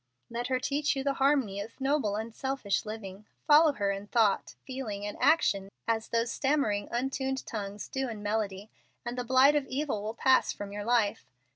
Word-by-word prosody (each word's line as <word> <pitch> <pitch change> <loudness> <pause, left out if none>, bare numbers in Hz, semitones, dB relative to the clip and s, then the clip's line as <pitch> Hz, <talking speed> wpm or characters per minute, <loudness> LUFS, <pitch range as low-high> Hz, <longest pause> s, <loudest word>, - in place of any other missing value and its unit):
"Let 240 +1 -2
her 255 -1 0
teach 290 +3 0
you 270 - -2
the 280 0 +1
harmony 265 -8 +2
of 220 +6 -10
noble, 270 -6 +1
unselfish 225 -1 -2
living. 210 -2 -7 0.2
Follow 300 0 +6
her 200 -6 0
in 200 +1 -5
thought, 220 -3 +2
feeling, 225 -7 -5
and 205 - -4
action, 250 -9 +3 0.2
as 225 -1 0
those 230 0 0
stammering, 265 -9 0
untuned 265 +2 -2
tongues 205 -2 -5
do 265 -1 -2
in 215 -2 -7
melody, 205 -1 -2 0.3
and 240 +1 -3
the 250 - -2
blight 260 +4 +5
of 285 -2 0
evil 270 -5 -2
will 215 +2 -4
pass 260 +2 +4
from 205 -1 -7
your 205 0 -5
life. 225 - +1
230 Hz, 180 wpm, -29 LUFS, 205-270 Hz, 0.3 s, Follow